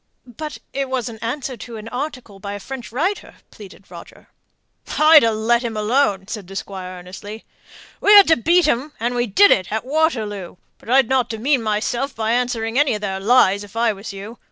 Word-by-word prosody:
"But 300 +5 -8 0.2
it 275 -1 -2
was 255 -2 -2
an 220 -1 -10
answer 255 +4 -4
to 230 0 -9
an 215 +1 -9
article 250 -6 -6
by 200 0 -6
a 205 - -6
French 245 0 -8
writer," 345 - -2 0.2
pleaded 205 -2 -14
Roger. - - -13 0.7
"I'd 310 0 +8
ha' 230 - +3
let 225 +2 +1
him 230 -3 -4
alone!" 210 -3 +1
said 205 -3 -6
the 195 - -11
Squire, 185 -2 -6
earnestly. 195 +4 -10 0.5
"We 410 - +3
had 405 -1 +9
to 320 - +6
beat 340 +7 +3
'em, 290 +3 -1
and 240 +2 -1
we 240 0 0
did 400 - +5
it 185 -2 +2
at 220 +2 -2
Waterloo; 225 - -1 0.2
but - - -14
I'd 260 -1 +4
not 260 -1 +1
demean 250 +4 0
myself 225 +5 -2
by 220 0 -1
answering 240 0 0
any 290 -6 +2
of 210 - -6
their 190 -2 -3
lies, 200 -2 +3
if 205 +1 -14
I 230 -1 +2
was 200 +2 -8
you. 200 +4 -9
230 Hz, 205 wpm, -20 LUFS, 205-265 Hz, 0.7 s, had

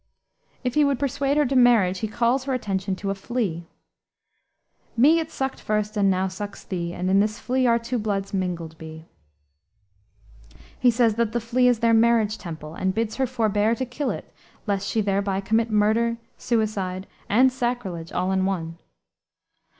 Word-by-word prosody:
If 250 -1 -1
he 300 - +4
would 280 -2 +2
persuade 280 +1 0
her 300 - +4
to 270 +1 -1
marriage 225 -7 +4
he 220 - -2
calls 240 +4 0
her 270 -2 0
attention 195 -4 -2
to 195 +1 -3
a - - 0
flea 195 -5 -3 1.3
"Me 300 +8 +6
it 320 -1 -4
sucked 265 -4 -4
first 210 0 -1
and 200 -2 +3
now 190 0 +1
sucks 200 +2 -7
thee, 170 -2 -4
And 180 +1 -3
in 195 +1 +4
this 210 +2 +1
flea 255 0 0
our 235 0 +4
two 235 +1 -3
bloods 200 -2 -2
mingled 175 -4 -3
be." 160 0 -10 1.7
He 250 - +5
says 230 -1 +3
that 230 -2 0
the 240 - +1
flea 245 +2 +2
is 245 -2 +2
their 230 0 +4
marriage 225 -1 +3
temple, 155 -4 -8
and 190 +2 -2
bids 225 -1 -2
her 265 -1 +1
forbear 220 -2 +1
to 260 - -3
kill 260 +3 -3
it - - -6 0.3
lest 200 -2 -1
she 220 - +1
thereby 195 -1 0
commit 220 +3 +1
murder, 220 +2 +2 0.2
suicide, 200 -5 -1 0.2
and 255 +5 +5
sacrilege 240 -10 -3
all 185 +1 -1
in 190 0 +1
one. 165 -4 -3
215 Hz, 175 wpm, -24 LUFS, 190-245 Hz, 1.7 s, Me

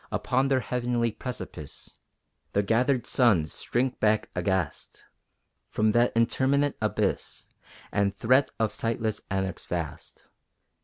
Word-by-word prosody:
Upon 130 +1 +1
their 135 -1 +2
heavenly 120 -1 0
precipice 95 - -8 0.5
The 100 - +2
gathered 125 +5 +2
suns 105 -12 +3
shrink 125 +2 -1
back 110 0 +2
aghast 90 -3 -2 0.6
From 110 0 +2
that 120 +2 +3
interminate 135 +5 +2
abyss, 105 - -1 0.4
And 100 -1 +2
threat 130 +6 +3
of 110 -1 +1
sightless 115 -1 -1
anarchs 95 0 -3
vast. 85 -4 -5
115 Hz, 110 wpm, -27 LUFS, 100-125 Hz, 0.6 s, suns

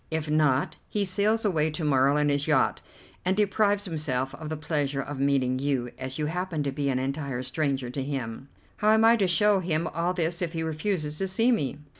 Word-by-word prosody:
If 160 -1 -2
not, 150 -3 +2
he 205 -1 0
sails 205 +4 +1
away 160 -6 +2
to 155 +2 -5
morrow 140 -1 +3
in 150 0 +2
his 145 +1 0
yacht, 150 -4 +2 0.4
and 185 +2 +1
deprives 205 0 +2
himself 145 -7 -2
of 155 -1 -7
the 155 - -3
pleasure 145 -2 -1
of 140 0 -5
meeting 135 -2 +1
you, 130 -3 -1
as 130 0 -5
you 155 - -1
happen 170 -1 -2
to 140 - -1
be 140 +1 -1
an 130 - +1
entire 135 -1 -3
stranger 135 -2 -2
to 135 - -3
him." 135 -1 -5 0.3
"How 215 0 +4
am 220 0 +4
I 230 +1 +7
to 195 -4 +2
show 205 +3 +3
him 165 -2 -1
all 170 +2 -1
this 170 0 -1
if 170 -1 -2
he 165 -1 -2
refuses 155 -1 -2
to 195 - 0
see 225 +6 +2
me?" 145 - 0
155 Hz, 215 wpm, -27 LUFS, 140-180 Hz, 0.4 s, I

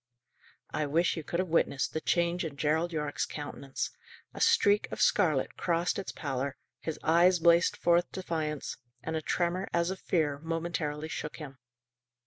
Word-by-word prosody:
I 150 - -1
wish 165 +5 +2
you 160 - -5
could 170 - -3
have 185 0 -1
witnessed 140 -6 +1
the 160 - -2
change 175 +1 +1
in 150 -4 -5
Gerald 160 +4 +1
Yorke's 150 -3 -2
countenance! 140 -2 -5 0.4
A - - -7
streak 205 +1 +4
of - - -5
scarlet 155 -10 +2
crossed 170 +1 0
its 195 - -4
pallor, 140 -2 -3 0.2
his 160 - -4
eyes 175 +3 +5
blazed 170 0 +4
forth 175 0 +3
defiance, 160 -5 -3 0.3
and 160 - -3
a 160 - -1
tremor, 180 +4 0
as 170 +1 +2
of 190 - -5
fear, 150 -5 0
momentarily 160 -2 -3
shook 150 -1 -5
him. 135 -4 -9
165 Hz, 160 wpm, -30 LUFS, 150-175 Hz, 0.4 s, eyes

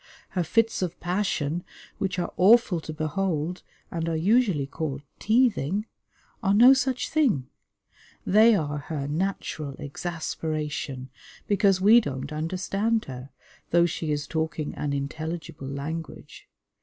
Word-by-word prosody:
Her 180 - -1
fits 225 +6 +1
of 180 -3 -3
passion, 175 -3 -1 0.4
which 190 -2 -1
are 175 - -2
awful 200 -3 +5
to 155 - -6
behold, 155 +2 -2 0.3
and 165 -1 -2
are 165 - -1
usually 190 - +2
called 140 0 -4 0.2
teething, 215 - +2 0.6
are 195 +1 +2
no 245 +5 +9
such 265 -1 0
thing; 225 - +2 0.8
they 220 +3 +6
are 150 -5 -1
her 145 -1 -4
natural 155 -3 -3
exasperation, 150 -3 -4 0.3
because 200 -2 +3
we 220 +5 +7
don't 140 - -5
understand 190 +8 -1
her, 130 0 -8 0.4
though 170 0 +4
she 160 -2 -2
is 145 0 -1
talking 160 -1 -2
an 145 - -3
intelligible 155 +1 -4
language. 150 +4 -6
165 Hz, 125 wpm, -26 LUFS, 150-200 Hz, 0.8 s, no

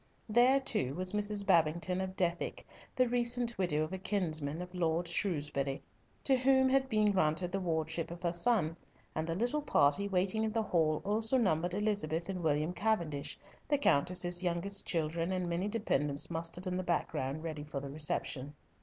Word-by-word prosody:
There, 245 +5 +5
too, 135 - -1
was 185 +2 -1
Mrs. 210 -1 -1
Babington 170 0 +2
of 190 0 -4
Dethick, 175 -2 -1 0.3
the 255 -1 +3
recent 240 0 +1
widow 155 -5 +1
of 155 - -5
a 190 - -4
kinsman 160 -7 +1
of 180 0 -7
Lord 170 -1 0
Shrewsbury, 145 -7 -1 0.4
to 270 - +4
whom 265 +1 +4
had 265 0 +2
been 215 -3 +3
granted 175 -1 +1
the 195 - -1
wardship 160 -2 -2
of 170 +1 -9
her 170 -1 0
son, 175 -4 +1 0.4
and 155 +1 -2
the 165 - -1
little 245 +9 0
party 195 - +2
waiting 195 +3 0
in 220 -1 -1
the 225 -1 +1
hall 160 -6 +1
also 220 +5 +1
numbered 180 -6 +1
Elizabeth 195 -5 -1
and 185 -2 -3
William 155 +1 +1
Cavendish, 170 -7 -1 0.3
the 290 - +2
Countess's 175 - +2
youngest 185 +3 -1
children, 165 +1 -1
and 185 -1 -1
many 175 +3 -1
dependants 150 -10 -1
mustered 165 +2 -3
in 180 0 -1
the 185 - -2
background, 155 -4 -2
ready 155 -3 -4
for 150 -2 -5
the 140 0 -7
reception. 145 -1 -2
180 Hz, 175 wpm, -33 LUFS, 160-210 Hz, 0.4 s, There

